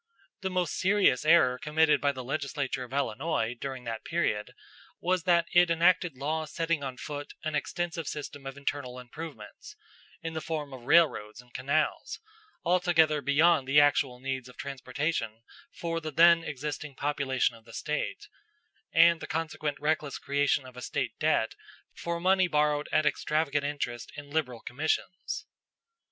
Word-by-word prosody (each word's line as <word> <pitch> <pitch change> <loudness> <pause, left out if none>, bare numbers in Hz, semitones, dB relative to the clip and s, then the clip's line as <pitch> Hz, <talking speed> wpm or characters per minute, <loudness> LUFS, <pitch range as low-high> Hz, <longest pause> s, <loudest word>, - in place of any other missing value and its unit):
The 190 - -1
most 180 -3 -1
serious 190 -9 +3
error 140 -6 +5
committed 155 +1 +3
by 145 0 +3
the 130 -2 -7
legislature 140 0 -2
of 125 - -11
Illinois 130 -2 -1
during 130 0 -6
that 115 -2 -5
period 160 -11 -1 0.4
was 180 -1 0
that 170 -2 +4
it 175 0 +6
enacted 170 -2 +3
laws 155 +2 -2
setting 165 -2 -1
on 130 -2 -5
foot 145 +2 -6
an 155 0 -2
extensive 170 +1 -2
system 145 -2 -6
of 135 +1 -7
internal 140 -3 -3
improvements, 125 -2 -9 0.5
in 165 0 -4
the 160 - -3
form 150 -4 -4
of 125 -2 -10
railroads 145 -9 +3
and 125 0 -16
canals, 145 +4 -1 0.5
altogether 165 -4 +3
beyond 145 +1 +4
the 140 +2 +6
actual 140 -3 +3
needs 130 -1 -4
of 125 - -16
transportation 130 -4 -3 0.3
for 165 -1 -3
the 155 - -4
then 170 +2 +6
existing 150 -1 -5
population 135 -4 0
of 115 -1 -18
the 115 - -14
State, 155 - -3 0.6
and 165 0 +6
the - - -7
consequent 155 -3 -3
reckless 150 -1 0
creation 140 -1 +1
of 130 -1 -12
a 125 - -8
State - - -3
debt - - +2 0.4
for 170 0 -3
money 185 +1 +3
borrowed 150 -2 +1
at 155 - +3
extravagant 150 -1 +1
interest 145 -5 -4
and 145 0 -9
liberal 125 -7 -1
commissions. 155 +7 -2
150 Hz, 155 wpm, -29 LUFS, 130-165 Hz, 0.6 s, it